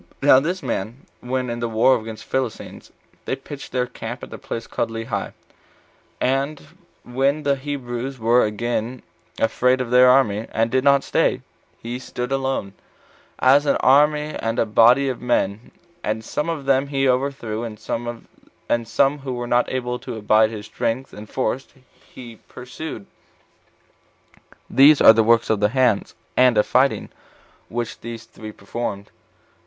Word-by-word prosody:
Now 135 -2 +7
this 175 +6 -3
man, 120 - -4
when, 130 +1 -3
in 120 - -4
the 120 0 -2
wars 115 +2 +3
against 110 0 -8
the - - -23
Philistines, 130 -4 -4 0.3
they - - -1
pitched 145 -1 -10
their 125 -1 0
camp 120 0 -8
at - - -9
a - - -8
place 115 - -6
called 115 - -2
Lehi, 115 -3 -4 0.9
and 135 +3 0 0.4
when 135 +4 0
the 140 -1 +2
Hebrews 135 -2 -5
were 120 +2 +3
again 120 +3 -3 0.3
afraid 125 +3 +2
of 125 -2 -3
their 125 0 +7
army, 115 -5 +3
and 115 +1 0
did 130 0 +1
not 140 -1 +4
stay, - - 0 0.4
he 120 +2 -5
stood 125 -1 -5
still 135 - +1
alone, 130 -7 -3 0.6
as 140 +3 +4
an 140 - +3
army 150 +3 +3
and 115 0 -2
a - - +2
body 120 +5 +5
of 130 -2 -3
men; 110 -3 -1 0.3
and 110 +1 -3
some 150 +7 -2
of 155 -5 -4
them 135 0 +2
he 135 -1 0
overthrew, 125 -4 -1
and 110 -2 -6
some 120 +3 -2
who 135 -2 -5
were 120 0 -4
not 120 0 +1
able 125 -1 -3
to 125 - -7
abide 110 +1 +3
his 105 -2 -8
strength 125 +5 -3
and 105 0 -10
force 130 0 -2 0.4
he 120 -3 -11
pursued. 125 -2 -8 1.6
These 140 +2 +6
are 110 - +9
the 115 - +3
works 115 0 +3
of 110 - +1
the 105 0 +2
hands, 125 -4 +1 0.2
and 125 -3 +4
of 105 - +4
fighting, 135 +2 +1 0.6
which 120 -1 -4
these 115 0 -7
three 110 0 -10
performed. 100 -1 -6
125 Hz, 160 wpm, -22 LUFS, 115-135 Hz, 1.6 s, are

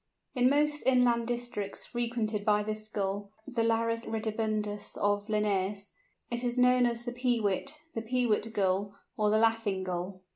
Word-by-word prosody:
In 250 -1 +4
most 295 +1 +2
inland 245 -3 +4
districts 240 -4 -3
frequented 230 -3 -2
by 210 -1 +3
this 215 0 -5
Gull 200 -1 -2 0.2
(the 245 -4 -1
Larus 230 0 +1
ridibundus 215 -2 -2
of 205 0 +1
Linnæus) 205 -2 0 0.4
it 240 +1 -1
is 245 0 -1
known 250 0 +5
as 235 0 -3
the 245 - -3
"Peewit," 245 +2 0 0.2
the 225 - -2
"Peewit 225 -2 +1
Gull," 200 -1 0 0.2
or 210 -1 +2
the 215 - +4
"Laughing 225 -4 +2
Gull." 185 +1 -4
220 Hz, 150 wpm, -30 LUFS, 205-240 Hz, 0.4 s, known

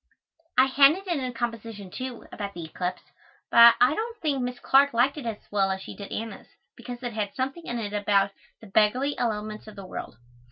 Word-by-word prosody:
I 260 - +7
handed 280 +8 +5
in 335 -8 -1
a 255 - -2
composition, 230 -4 -5
too, 255 +1 -6
about 200 -1 -6
the 170 -2 -6
eclipse, 180 +3 -4 0.5
but 235 0 +9
I 250 +3 +5
don't 460 +6 -4
think 290 -6 0
Miss 250 0 -3
Clark 275 +3 +4
liked 250 +4 +3
it 285 -6 -6
as 220 -2 -3
well 195 -2 +2
as 190 0 -1
she - - -9
did 200 - -9
Anna's, 225 0 -6 0.3
because 245 0 -8
it 240 -2 -3
had 210 -2 -3
something 270 +6 -3
in 240 - -3
it 210 -3 -4
about 200 -1 +2 0.3
"the - - -12
beggarly 220 +8 +2
elements 215 -2 -3
of 215 - -10
the 195 -2 -9
world." - - -7
235 Hz, 205 wpm, -26 LUFS, 205-265 Hz, 0.5 s, but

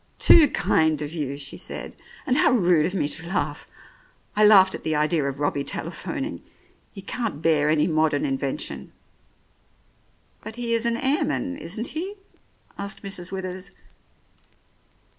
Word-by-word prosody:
"Too 320 -3 +7
kind 160 - +1
of 150 +2 -6
you," 140 -4 -3
she 140 -1 -4
said, - - -5 0.3
"and 255 - +1
how - - +4
rude 175 -8 +3
of 185 - -5
me 160 - 0
to 165 +2 -7
laugh 190 - -2 0.7
1 215 - +3
I - - +8
laughed 190 -3 +7
at - - -5
the 160 -1 0
idea 150 +1 +1
of 140 0 -3
Robbie 145 -1 0
tele - - -3
phoning. - - -5 0.5
He 195 - -10
can't 225 -5 -3
bear 150 -2 +3
any 155 -1 +3
modern 160 - +1
invention." 270 -2 -3 1.5
"But 220 - -7
he 235 -1 -2
is 230 0 +1
an 235 0 0
airman, 235 - 0
isn't 205 +8 -4
he?" 370 +6 -5 0.6
asked 200 +1 -5
Mrs. 190 -2 -5
Withers. 185 0 -5
180 Hz, 155 wpm, -24 LUFS, 155-225 Hz, 1.5 s, I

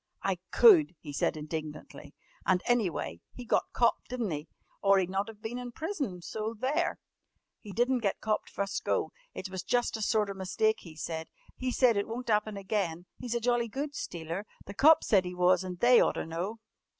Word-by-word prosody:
"I - - 0
could!" 345 - +7
he 145 -3 -8
said 150 - 0
indignantly. 155 0 -7 0.3
"And, 185 -1 +2
any 240 -6 +3
way, 85 - -5
he 245 - -8
got - - +1
copped 235 - +1
di'n't 240 -8 -2
he? 150 +2 -5 0.3
or 195 0 +5
he'd 185 -1 0
not 195 +3 -1
of 215 0 -13
been 235 +3 -4
in 245 -1 -6
prison, 275 - -4
so 220 +4 -4
there!" 270 +5 0 0.6
"He 210 - -10
di'n't 245 +4 +1
get 200 -3 0
copped 215 -1 -1
fust 200 0 -3
go. - - 0 0.2
It 190 - -6
was 190 -1 -3
jus' 245 +2 0
a 220 - -4
sorter 210 -2 +1
mistake, 195 +3 0
he 165 -3 -12
said. 160 +1 -4 0.3
He 255 - -2
said 245 -4 +4
it 200 - 0
wun't 235 +2 -5
happen 210 -1 +1
again. 190 -4 -2
He's 240 -2 -3
a - - +1
jolly 240 0 +1
good 280 +6 -4
stealer. 170 - -5 0.2
The 200 - -8
cops 310 +9 +6
said 195 -4 +4
he 180 0 -6
was 180 +1 +4
and 180 -1 -6
they 245 +3 +7
oughter - - +1
know." 175 +7 -4
210 Hz, 200 wpm, -30 LUFS, 180-240 Hz, 0.6 s, could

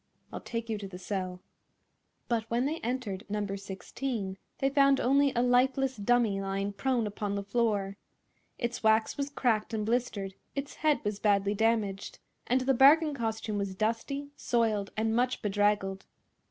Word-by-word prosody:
"I'll - - -5
take 230 -1 -4
you 220 -2 -2
to 200 - -6
the 185 -2 -9
cell." 185 -1 -4 0.9
But 225 -1 -1
when 240 +2 +1
they 310 +3 -1
entered 230 -5 -3
No. 210 0 -1
16 200 +2 -4 0.2
they 270 - +1
found 275 -1 +4
only 275 +2 +3
a 240 - +3
lifeless 260 +2 +2
dummy 215 -2 +2
lying 195 +1 -2
prone 235 +3 0
upon 205 -1 -3
the 200 - -2
floor. 200 -2 0 0.6
Its 240 0 -3
wax 220 0 +3
was 280 0 -2
cracked 230 -5 0
and 215 -1 -1
blistered, 220 -4 -1 0.2
its 280 0 -5
head 305 -1 +2
was 210 -1 -2
badly 200 -1 +2
damaged, 210 -2 0 0.3
and 255 +2 +2
the 265 +1 +2
bargain 295 +4 +6
costume 220 -4 -2
was 195 -1 -3
dusty, 230 +7 -2
soiled 220 -6 0
and 220 +1 +1
much 250 +1 0
bedraggled. 205 -1 0
220 Hz, 160 wpm, -30 LUFS, 200-255 Hz, 0.9 s, bargain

